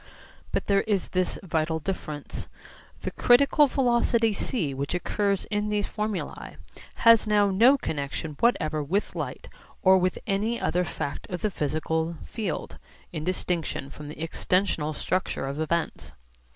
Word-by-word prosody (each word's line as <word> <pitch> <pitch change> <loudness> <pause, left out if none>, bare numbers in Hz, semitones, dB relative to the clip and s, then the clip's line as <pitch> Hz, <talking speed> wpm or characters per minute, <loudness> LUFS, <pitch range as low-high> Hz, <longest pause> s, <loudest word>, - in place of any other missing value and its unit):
But - - -1
there 200 -1 +3
is 200 -4 0
this 185 0 0
vital 160 -2 0
difference: 155 -3 -5 0.5
the - - -3
critical 280 +4 +5
velocity 240 -4 +2
c 195 - -1
which 140 +5 -2
occurs 200 +2 0
in 210 0 0
these 210 -1 0
formulae 210 -2 -4 0.5
has 230 -1 +7
now 205 -1 +4
no 240 +9 +6
connexion 150 - -4
whatever 155 -10 +2
with 185 +9 -1
light - - -5 0.4
or 190 0 +7
with 185 0 0
any 220 +4 0
other 180 +1 +1
fact 145 -2 -5
of 180 -2 -4
the 215 - 0
physical 160 +1 -1
field 210 -8 -4 0.3
(in 155 -2 -3
distinction 170 -5 -2
from 150 0 -9
the 150 - -7
extensional 165 -4 0
structure 185 -4 -1
of 140 +2 -4
events). 160 - -2
185 Hz, 140 wpm, -26 LUFS, 155-210 Hz, 0.5 s, has